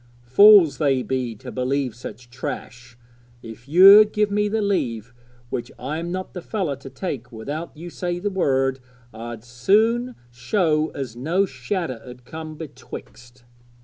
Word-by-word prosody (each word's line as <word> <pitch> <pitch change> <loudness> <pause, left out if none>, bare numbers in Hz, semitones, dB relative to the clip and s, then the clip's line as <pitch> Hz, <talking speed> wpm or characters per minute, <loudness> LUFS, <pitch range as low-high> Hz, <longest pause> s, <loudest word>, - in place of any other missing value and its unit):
Fools 175 - +7
they 135 -4 +2
be 125 -3 -2
to 125 +4 -10
believe 130 0 -1
such 120 0 -10
trash! 120 -1 -7 0.5
If 115 +2 -11
you'd 200 +6 +8
give 210 -1 +1
me 210 +1 +1
the 220 +2 -1
leave 120 - -2 0.4
which 120 0 -4
I'm 155 +6 -4
not 185 +1 -5
the 180 - -6
fellow 180 -7 -2
to 135 0 -11
take 130 -8 -6
without 145 +9 -6
you 170 +2 -8
say 175 0 -3
the 200 +3 -3
word 135 -7 +1 0.3
I'd 115 0 -8
soon 220 - +1 0.2
show 155 - 0
as 130 -5 -5
no 165 +11 +1
shadder 130 - -4
'ud 125 -1 -12
come 155 +2 -8
betwixt.' 130 -5 -11
140 Hz, 145 wpm, -22 LUFS, 125-185 Hz, 0.5 s, you'd